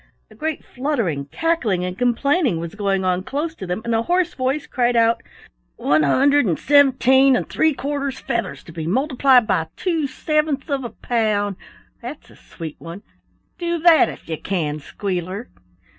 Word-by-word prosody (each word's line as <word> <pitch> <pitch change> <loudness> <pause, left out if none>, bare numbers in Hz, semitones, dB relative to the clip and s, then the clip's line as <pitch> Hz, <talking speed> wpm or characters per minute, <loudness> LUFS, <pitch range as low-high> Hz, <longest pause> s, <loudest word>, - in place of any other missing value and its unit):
A - - -15
great 315 -1 -4
fluttering, 235 - -2
cackling, 235 - 0
and 180 0 -4
complaining 245 - +1
was 170 0 -6
going 195 -2 -1
on 180 0 +1
close 295 - -3
to 190 - -8
them, 180 +5 -3
and 235 - -1
a 225 - +2
hoarse 350 +6 +1
voice 265 +3 -1
cried 245 -2 0
out: 230 0 +3 0.5
"One 150 - +2
hundred 275 - +3
and 170 - +1
seventeen 270 -2 +5
and - - -1
three 315 -2 +1
quarters 280 0 -3
feathers 235 -1 -3
to - - -12
be 160 -1 -5
multiplied 260 - +3
by 180 -6 0
two 330 -6 0
sevenths 305 +1 -1
of 275 -1 -1
a 240 - -4
pound. 215 -3 -1 0.5
That's - - -9
a - - -17
sweet 160 -3 -9
one! 170 +5 -9 0.6
Do 340 -1 -1
that 330 -1 +5
if - - -11
you 160 -2 -4
can, 155 -6 -2
Squealer." 185 - -4
245 Hz, 170 wpm, -21 LUFS, 185-285 Hz, 0.6 s, seventeen